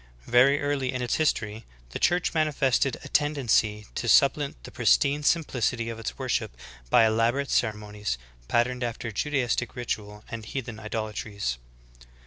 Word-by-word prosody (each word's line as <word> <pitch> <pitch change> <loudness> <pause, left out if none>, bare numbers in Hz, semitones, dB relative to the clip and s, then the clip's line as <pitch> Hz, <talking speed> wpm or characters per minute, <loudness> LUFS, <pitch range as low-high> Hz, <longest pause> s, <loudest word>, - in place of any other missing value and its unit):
Very 130 +4 +5
early 140 -3 -1
in 125 -1 -3
its 120 - 0
history, 110 -8 0 0.3
the - - -5
Church 175 0 +2
manifested 140 -4 +1
a - - -8
tendency 120 -8 +1
to 120 - -3
supplant 140 - +3
the - - -10
pristine 140 - +3
simplicity 125 -7 0
of 115 -1 -6
its 115 - -5
worship - - -2 0.3
by 115 - +6
elaborate 115 +5 +1
ceremonies, 105 - -1 0.3
patterned 125 - +1
after 115 -1 -4
Juda 145 +7 -1
istic 120 -1 -2
ritual 105 -3 -4
and 115 -1 -6
heathen 120 -1 -5
idolatries. 105 - -4
120 Hz, 140 wpm, -26 LUFS, 110-140 Hz, 0.3 s, by